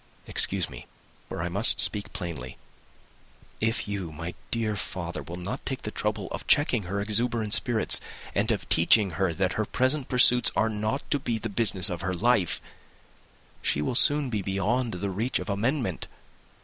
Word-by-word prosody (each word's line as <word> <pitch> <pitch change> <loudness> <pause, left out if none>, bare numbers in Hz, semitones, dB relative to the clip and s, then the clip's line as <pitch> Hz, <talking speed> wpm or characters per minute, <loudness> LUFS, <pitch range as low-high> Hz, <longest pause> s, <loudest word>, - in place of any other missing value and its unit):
Excuse 95 -3 0
me, - - -11 0.4
for 80 - -4
I - - -1
must 100 +6 +4
speak 105 -1 0
plainly. 80 - -6 1.0
If 115 0 -1
you, 100 -5 -4
my 85 +3 -6 0.2
dear 110 -2 -1
father, 85 -3 -4
will 80 +5 -8
not 100 +9 -5
take 130 -2 -4
the 105 - -4
trouble 105 -2 -2
of - - -6
checking 125 -8 +3
her 100 +1 -2
exuberant 110 +1 0
spirits, 120 -3 +4 0.3
and 105 +3 0
of 100 -6 -3
teaching 95 +4 +5
her 90 +2 0
that 95 +2 -1
her 110 - -1
present 130 +5 0
pursuits 125 -1 +5
are 110 - +2
not 110 +5 -2
to 145 - +2
be 120 -4 -2
the 110 +1 -5
business 100 -3 +2
of 90 - -2
her 95 +1 -2
life, 105 -2 +1 1.0
she - - 0
will 75 - -1
soon 145 +1 +4
be 105 -3 -1
beyond 100 +5 -1
the 95 +2 -3
reach 115 +7 -1
of - - -4
amendment. 115 - -2
105 Hz, 175 wpm, -26 LUFS, 90-120 Hz, 1.0 s, teaching